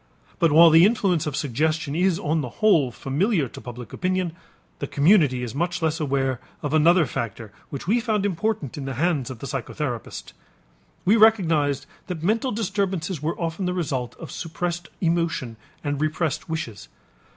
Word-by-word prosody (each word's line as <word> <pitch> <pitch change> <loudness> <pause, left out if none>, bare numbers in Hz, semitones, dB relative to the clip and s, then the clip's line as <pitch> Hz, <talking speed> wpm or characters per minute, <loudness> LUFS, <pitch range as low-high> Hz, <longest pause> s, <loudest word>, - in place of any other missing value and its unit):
But 165 -4 +4
while 165 +2 +8
the 165 +2 +7
influence 195 -7 +2
of 145 - -2
suggestion 150 +3 -1
is 180 0 +2
on 155 +2 0
the 125 - -4
whole 170 -12 +4
familiar 150 - 0
to - - -10
public 120 -3 -9
opinion, 185 -2 -1 0.5
the 140 - -3
community 145 -5 +3
is 115 -2 -5
much 175 +4 -1
less 160 -1 0
aware 135 -4 0 0.2
of 145 0 -2
another 165 +2 +5
factor 115 -5 -5 0.2
which 140 - -6
we 225 +6 +2
found 215 -4 0
important 185 - -2
in 135 - -5
the 135 -1 -4
hands 150 -3 0
of 130 - -7
the 125 - -8
psychotherapist. 135 -2 -5 0.7
We 205 +5 +5
recognized 165 -10 +3 0.2
that 175 -4 -5
mental 225 +7 +1
disturbances 190 -6 -2
were 160 +2 -2
often 170 +2 -2
the 180 - -1
result 140 -8 -2
of - - -9
suppressed 170 0 -4
emotion 165 -8 0 0.3
and 145 -1 -2
repressed 155 0 -1
wishes. 115 -11 -5
160 Hz, 165 wpm, -24 LUFS, 140-180 Hz, 0.7 s, while